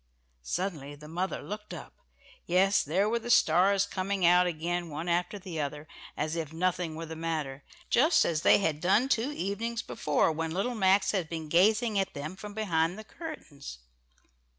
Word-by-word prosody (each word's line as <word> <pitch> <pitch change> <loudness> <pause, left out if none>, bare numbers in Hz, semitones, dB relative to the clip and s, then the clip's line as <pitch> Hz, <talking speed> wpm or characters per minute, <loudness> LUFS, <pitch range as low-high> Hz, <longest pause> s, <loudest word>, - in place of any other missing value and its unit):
Suddenly 150 - -4
the 150 +1 -13
mother 180 +4 -3
looked 210 +1 -7
up - - -10 0.5
yes, 195 +3 +3
there 185 +8 +1
were 235 +2 0
the 235 - -8
stars 195 -1 +4
coming 195 -1 -1
out 180 +1 +5
again 175 +1 -2
one 155 +3 -5
after 175 +4 0
the 180 -5 -5
other, 145 +1 -5 0.3
as 155 +2 -2
if 160 -3 -4
nothing 175 -1 -1
were 165 +1 -5
the 160 0 -7
matter; 155 -4 -3 0.2
just 320 +7 +4
as 160 -2 0
they - - +6
had 160 -6 -1
done 200 +8 +3
two 250 +3 +1
evenings 230 +1 -3
before 150 +2 +1
when 165 +1 -3
little 195 +9 -1
Max 195 -2 +3
had 185 -6 -2
been 160 -2 -5
gazing 210 +5 +3
at 195 - -2
them 155 +5 -5
from 205 +1 -9
behind 175 -4 0
the 215 - -8
curtains. 215 - -9
180 Hz, 175 wpm, -29 LUFS, 160-200 Hz, 0.5 s, they